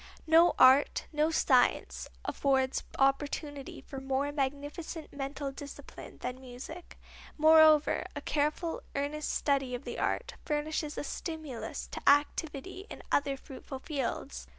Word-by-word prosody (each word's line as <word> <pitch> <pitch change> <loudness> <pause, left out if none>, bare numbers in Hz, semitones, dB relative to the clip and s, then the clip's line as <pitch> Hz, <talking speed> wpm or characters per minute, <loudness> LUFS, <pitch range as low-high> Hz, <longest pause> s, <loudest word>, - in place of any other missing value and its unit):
No 325 +2 +6
art, 260 +2 +6
no 305 +1 +2
science, 260 -6 +2 0.2
affords 265 -2 +1
opportunity 280 +1 -1
for 270 -1 -8
more 270 +2 -1
magnificent 290 +3 -4
mental 275 0 -4
discipline 280 +1 -10
than 250 +1 -4
music. 265 +7 -10 0.4
Moreover, 315 -1 +6
a - - -4
careful, 305 +3 -1
earnest 290 +2 -2
study 270 -3 0
of 245 - -7
the - - -6
art - - -1
furnishes 300 0 -2
a - - -2
stimulus 310 -6 -5
to - - -6
activity 300 +6 +1
in - - -9
other 280 -1 +1
fruitful 265 0 -9
fields. 260 - -4
285 Hz, 125 wpm, -31 LUFS, 270-310 Hz, 0.4 s, No